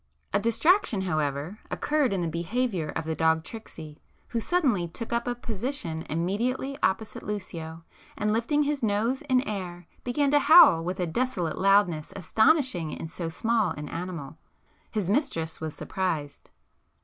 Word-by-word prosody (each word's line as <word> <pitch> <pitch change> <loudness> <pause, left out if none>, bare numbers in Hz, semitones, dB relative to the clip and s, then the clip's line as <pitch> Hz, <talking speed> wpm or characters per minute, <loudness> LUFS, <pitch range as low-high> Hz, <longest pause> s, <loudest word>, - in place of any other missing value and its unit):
A 200 - +4
distraction 230 - +3
however 155 +1 -2
occurred 295 -5 +1
in 190 -3 0
the - - -1
behaviour 175 +2 -1
of 160 - -2
the 160 - -1
dog 160 0 +2
Tricksy, 160 -7 -10 0.3
who 235 - -1
suddenly 245 - +1
took 225 +8 -6
up 235 +1 0
a 245 - 0
position 225 - -4
immediately 225 - -1
opposite 215 +2 0
Lucio, 165 -5 -6 0.3
and 210 0 +1
lifting 290 +7 +2
his 290 -1 -1
nose 225 +4 +1
in 260 -4 +2
air 180 -4 -5 0.2
began 275 +3 +1
to 290 - +5
howl 290 - +8
with 180 +2 -3
a 180 - +1
desolate 180 -3 -1
loudness 195 -5 +3
astonishing 220 - +2
in 150 - -6
so 165 0 -5
small 220 0 +1
an 150 0 -6
animal. 165 -4 -6 0.5
His 210 -5 -2
mistress 185 - -1
was 160 -1 -4
surprised. 155 -7 -3
195 Hz, 150 wpm, -27 LUFS, 165-245 Hz, 0.5 s, howl